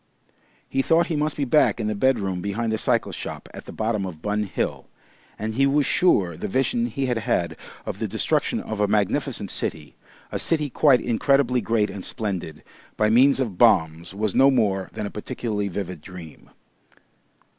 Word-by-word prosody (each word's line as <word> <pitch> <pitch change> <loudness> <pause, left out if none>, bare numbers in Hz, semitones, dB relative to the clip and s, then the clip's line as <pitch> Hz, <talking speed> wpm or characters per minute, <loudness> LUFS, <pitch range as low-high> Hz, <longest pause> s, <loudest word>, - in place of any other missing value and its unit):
He 135 - 0
thought 165 +4 +3
he - - 0
must 150 0 -1
be 145 - 0
back 140 -1 +3
in 110 - -2
the 105 - 0
bedroom 100 -5 0
behind 110 +4 -2
the 110 - -1
cycle - - +1
shop - - -7
at - - -9
the - - -9
bottom 110 -2 -1
of 90 -5 -6
Bun 105 +4 -1
Hill, 95 - -3 0.5
and 110 +1 -3
he 135 +4 +3
was 145 +1 +2
sure 95 - +2
the 105 - -4
vision 135 - 0
he 135 - -2
had 125 -3 0
had 85 -5 -1 0.3
of - - -5
the - - -1
destruction - - 0
of 110 - -5
a 105 - +3
magnificent 105 +1 0
city, 75 -3 -4 0.4
a - - -2
city 150 -4 0
quite 135 -1 +4
incredibly 125 +1 +2
great 110 -3 +1
and 95 - -7
splendid, 95 -9 -4 0.3
by 105 0 +2
means 130 +4 +5
of 110 -9 -3
bombs, 80 0 +3
was 105 0 -1
no 135 +1 +6
more 100 -7 +1
than 110 -1 -4
a 100 - -5
particularly 105 -2 -3
vivid 90 -3 -5
dream. 85 -3 -11
110 Hz, 185 wpm, -24 LUFS, 95-135 Hz, 0.5 s, no